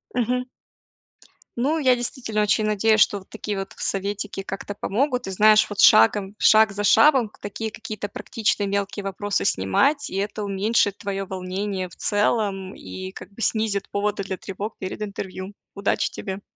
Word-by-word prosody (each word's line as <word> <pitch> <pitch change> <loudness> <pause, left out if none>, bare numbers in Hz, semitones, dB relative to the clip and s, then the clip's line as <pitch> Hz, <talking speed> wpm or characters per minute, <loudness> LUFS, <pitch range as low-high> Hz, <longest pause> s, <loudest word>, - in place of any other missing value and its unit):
Мгм. 250 +1 0 1.1
Ну, 295 +6 +1
я 255 -3 +4
действительно 235 -3 -2
очень 210 +1 +2
надеюсь, 215 +1 +3
что 205 - +4
вот 190 - -19
такие 210 -2 -4
вот 195 - -6
советики 200 0 -3
как-то 195 +1 -6
помогут. 250 +5 -1
И, 195 - -3
знаешь, 215 +2 +5
вот 205 - -7
шагом 190 - +6
шаг 215 -1 +6
за 205 +1 -4
шагом 265 -3 +5
такие 215 +2 -5
какие-то 215 -2 -6
практичные 205 0 -1
мелкие 200 0 -2
вопросы 200 +1 -2
снимать, 275 - +1
и - - -7
это 205 +2 -2
уменьшит 200 +1 +1
твоё 195 -1 -4
волнение 190 0 -4
в - - -16
целом 205 -2 0
и 185 0 -8
как 200 - -11
бы 230 - -10
снизит 215 -2 0
поводы 200 0 -1
для 190 -1 -4
тревог 200 +3 -6
перед 190 +3 -6
интервью. 195 -1 -6 0.2
Удачи 200 0 0
тебе! 195 -1 -6
205 Hz, 160 wpm, -23 LUFS, 195-220 Hz, 1.1 s, шагом